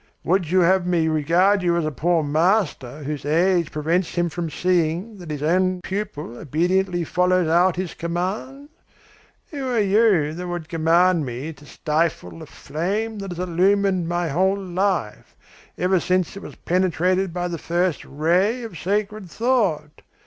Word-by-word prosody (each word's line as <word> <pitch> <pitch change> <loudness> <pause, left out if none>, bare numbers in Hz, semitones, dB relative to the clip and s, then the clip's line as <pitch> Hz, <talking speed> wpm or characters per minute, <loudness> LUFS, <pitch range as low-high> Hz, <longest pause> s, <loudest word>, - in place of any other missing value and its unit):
Would 180 -2 +1
you 185 +1 +3
have 180 +1 +3
me 170 -3 +2
regard 175 +6 +2
you 170 -1 +1
as 170 - 0
a 155 - -1
poor 165 +4 +1
master 155 - 0
whose 145 0 -4
age 170 +3 +2
prevents 165 +4 -1
him 175 -1 +1
from 170 0 -4
seeing 180 +5 -1
that 175 -3 -10
his 150 -1 -4
own 185 +3 +2
pupil 155 - -5
obediently 175 +4 0
follows 180 +1 +1
out 175 +3 +3
his 185 -1 -4
commands? 195 - -4 0.8
Who 280 -4 -4
are 245 -2 -1
you 200 -7 +3
that 180 +2 -6
would 175 -2 -5
command 170 +1 +3
me 130 +7 -5
to 145 0 -17
stifle 150 - -2
the - - -10
flame 205 +9 -3
that 195 -2 -5
has 180 +1 -4
illuminated 185 0 +2
my 175 -1 -1
whole 190 +6 +1
life, 185 - -2 0.4
ever 185 0 +2
since 180 0 0
it 200 - -8
was - - -10
penetrated 185 +1 0
by 175 +1 -2
the 170 -2 -5
first 175 0 -1
ray 180 - 0
of 215 -9 -8
sacred 205 0 -2
thought? 195 - 0
175 Hz, 160 wpm, -22 LUFS, 160-190 Hz, 0.8 s, you